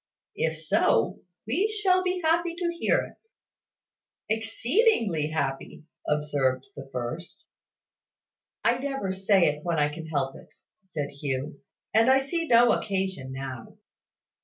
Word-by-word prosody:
"If 160 Hz, 0 st, 0 dB
so, 155 Hz, -7 st, +2 dB, 0.3 s
we 330 Hz, -, +1 dB
shall 405 Hz, -4 st, +2 dB
be 365 Hz, 0 st, -1 dB
happy 335 Hz, +1 st, +2 dB
to 345 Hz, 0 st, -1 dB
hear 340 Hz, -, +2 dB
it." 445 Hz, -, -17 dB, 1.0 s
"Exceedingly 225 Hz, -, +2 dB
happy," 140 Hz, -2 st, -3 dB, 0.2 s
observed 145 Hz, -4 st, 0 dB
the 135 Hz, -1 st, -9 dB
first. 125 Hz, +8 st, -5 dB, 1.2 s
"I 240 Hz, +1 st, +3 dB
never 270 Hz, -8 st, -2 dB
say 190 Hz, 0 st, +3 dB
it 150 Hz, 0 st, 0 dB
when 170 Hz, -2 st, 0 dB
I 150 Hz, 0 st, +3 dB
can 160 Hz, +1 st, -7 dB
help 140 Hz, -4 st, -1 dB
it," -, -, -14 dB, 0.3 s
said 160 Hz, -7 st, -5 dB
Hugh; 140 Hz, 0 st, -4 dB, 0.3 s
"and 225 Hz, +3 st, +5 dB
I 265 Hz, -, +7 dB
see 325 Hz, +5 st, -1 dB
no 240 Hz, -1 st, +6 dB
occasion 190 Hz, -9 st, -2 dB
now." 130 Hz, -3 st, -7 dB
190 Hz, 130 wpm, -27 LUFS, -, 1.2 s, I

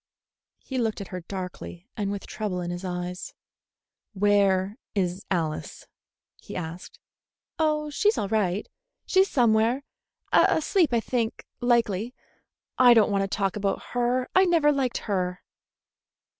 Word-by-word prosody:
He 260 Hz, -2 st, -5 dB
looked 225 Hz, -3 st, -1 dB
at 200 Hz, -, -7 dB
her 185 Hz, -, -5 dB
darkly 180 Hz, 0 st, -7 dB
and 205 Hz, -3 st, -2 dB
with 200 Hz, -1 st, -5 dB
trouble 205 Hz, -4 st, -3 dB
in 175 Hz, 0 st, -3 dB
his 175 Hz, +1 st, -5 dB
eyes. 180 Hz, 0 st, -5 dB, 0.8 s
"Where 200 Hz, 0 st, +2 dB, 0.2 s
is 185 Hz, -1 st, -1 dB
Alice?" 160 Hz, -5 st, -3 dB, 0.5 s
he -, -, -10 dB
asked. 170 Hz, 0 st, -6 dB, 0.6 s
"Oh, 305 Hz, -1 st, +1 dB
she's 420 Hz, +7 st, +2 dB
all 200 Hz, -, -1 dB
right. 200 Hz, -2 st, 0 dB, 0.4 s
She's 380 Hz, +1 st, +3 dB
somewhere. 235 Hz, +1 st, +3 dB, 0.5 s
Asleep, 320 Hz, -1 st, +4 dB
I 235 Hz, -1 st, +2 dB
think 230 Hz, -1 st, -2 dB
likely. 235 Hz, -2 st, +1 dB, 0.6 s
I 245 Hz, -2 st, +8 dB
don't 215 Hz, -2 st, +4 dB
want 200 Hz, -1 st, +2 dB
to 195 Hz, -, 0 dB
talk 195 Hz, -1 st, -1 dB
about 200 Hz, -1 st, -1 dB
her. 245 Hz, +1 st, +1 dB
I 375 Hz, +1 st, +6 dB
never 330 Hz, -4 st, +4 dB
liked 265 Hz, -4 st, 0 dB
her." 180 Hz, -3 st, -2 dB
210 Hz, 135 wpm, -26 LUFS, 185-250 Hz, 0.8 s, I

